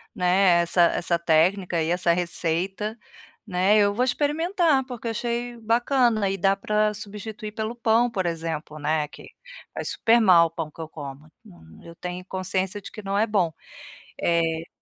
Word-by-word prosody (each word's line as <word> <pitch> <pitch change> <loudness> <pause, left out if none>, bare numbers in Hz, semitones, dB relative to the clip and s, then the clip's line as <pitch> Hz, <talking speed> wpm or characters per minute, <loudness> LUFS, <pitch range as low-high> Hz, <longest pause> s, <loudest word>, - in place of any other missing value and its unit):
né, 180 -1 +4
essa 170 +1 +2
essa 170 0 0
técnica 170 +2 +2
e 160 - -1
essa 175 -1 +2
receita, 180 +5 -1 0.5
né. 190 +1 +2
Eu 205 -1 +3
vou 245 - +1
experimentar, 300 +3 +1
porque 245 -3 -8
eu - - 0
achei 240 +1 -3
bacana 230 -2 +2
e 195 - -2
dá 195 +1 +2
para 210 +1 0
substituir 210 +1 -7
pelo 220 +2 -4
pão, 235 +1 +2
por 195 -6 -2
exemplo, 160 -2 -4
né, 150 0 0
que - - -13 0.4
faz - - -4
super 230 +1 +3
mal 180 -6 +6
o - - -15
pão 165 -2 -5
que 165 - -10
eu 160 - -7
como, 145 -1 -9 0.6
eu 170 - -12
tenho 180 0 -6
consciência 190 +1 -3
de - - -9
que 215 -1 -9
né 200 +3 0
bom. 195 -6 +1 0.7
Eh 165 -1 0
195 Hz, 165 wpm, -24 LUFS, 170-220 Hz, 0.7 s, mal